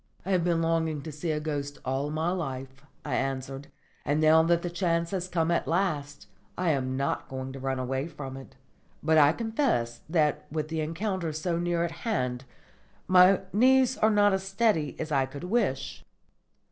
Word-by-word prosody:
"I 195 - -2
have 180 -3 +2
been 170 -1 +1
longing 160 -3 0
to 160 - -6
see 150 +3 -5
a 155 -1 0
ghost 145 -2 -4
all 135 +3 -1
my 160 +3 -1
life," 135 -6 -5 0.2
I 145 - -3
answered; 135 +1 -3 0.4
"and 145 +2 0
now 155 +1 +6
that 170 +1 +2
the 175 - -2
chance 170 -2 0
has 185 -2 -2
come 170 -2 0
at 170 - 0
last, 150 -5 -1 0.3
I 180 -2 +2
am 130 -2 -1
not 140 +1 -2
going 130 0 -5
to 135 - -7
run 135 0 -2
away 130 +3 -2
from 135 -5 -8
it. 135 0 -11 0.5
But 160 0 +4
I 145 -1 +7
confess 220 - -1
that 155 -3 +1
with 155 0 -3
the 160 -1 -2
encounter 170 +2 -2
so 165 +2 -2
near 175 -1 0
at 170 - -2
hand 125 - -2 0.6
my 185 +1 +6
knees 260 +3 +4
are 220 - +4
not 205 -1 +4
as 190 - 0
steady 195 -6 0
as 155 0 -4
I 135 -2 +2
could 140 +3 -9
wish." 180 - -1
160 Hz, 185 wpm, -28 LUFS, 140-180 Hz, 0.6 s, I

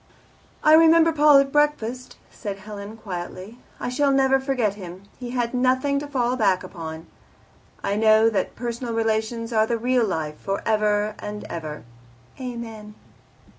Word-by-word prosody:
"I 310 - +6
remember 330 +1 +6
Paul 300 -2 +6
at 275 0 +3
breakfast," 255 -5 0
said 200 -3 -6
Helen 205 +2 -9
quietly. 190 +2 -7 0.2
"I - - -3
shall 280 +3 +1
never 270 0 +3
forget 260 -6 0
him. 185 -2 -10 0.2
He 245 -1 -6
had 240 -1 -2
nothing 260 +3 +1
to 290 - -6
fall 250 -3 0
back 195 -6 +2
upon. 160 -2 -8 0.8
I 200 - 0
know 220 0 +5
that 220 -3 -1
personal 235 0 -4
relations 225 +1 -1
are 220 0 +3
the 235 - 0
real 245 +1 +1
life, 155 -5 -3
for 195 0 -3
ever 210 -1 +1
and 210 0 -6
ever. 155 -7 -6 0.6
"Amen!" 225 -4 -7
225 Hz, 150 wpm, -23 LUFS, 205-255 Hz, 0.8 s, I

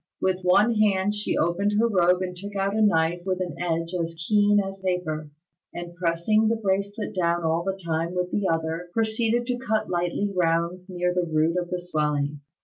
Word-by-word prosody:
With 185 0 0
one 200 +6 +4
hand 205 -1 +2
she 210 0 -1
opened 190 +5 +1
her 230 +2 +4
robe 180 -3 +3
and 180 -1 -4
took 200 +3 -8
out 195 +1 0
a 220 - +1
knife 170 -4 +2
with 185 0 -1
an 180 -3 -3
edge 165 0 -1
as 170 -2 -2
keen 205 -1 +4
as 195 -1 -4
paper, 170 -5 -2 0.5
and 175 0 -6
pressing 175 +5 +1
the 230 - +2
bracelet 200 0 -2
down 170 -2 0
all 165 +1 +1
the 195 +1 -3
time 165 +2 -1
with 180 0 -1
the 205 -2 0
other, 165 +2 -2
proceeded 225 +1 +1
to 245 0 -2
cut 220 -5 -1
lightly 175 +3 -1
round 170 +2 0
near 180 -1 -1
the 180 -2 -1
root 155 +2 +2
of 175 -1 -2
the 180 - -1
swelling. 150 -4 -1
180 Hz, 195 wpm, -25 LUFS, 170-205 Hz, 0.5 s, one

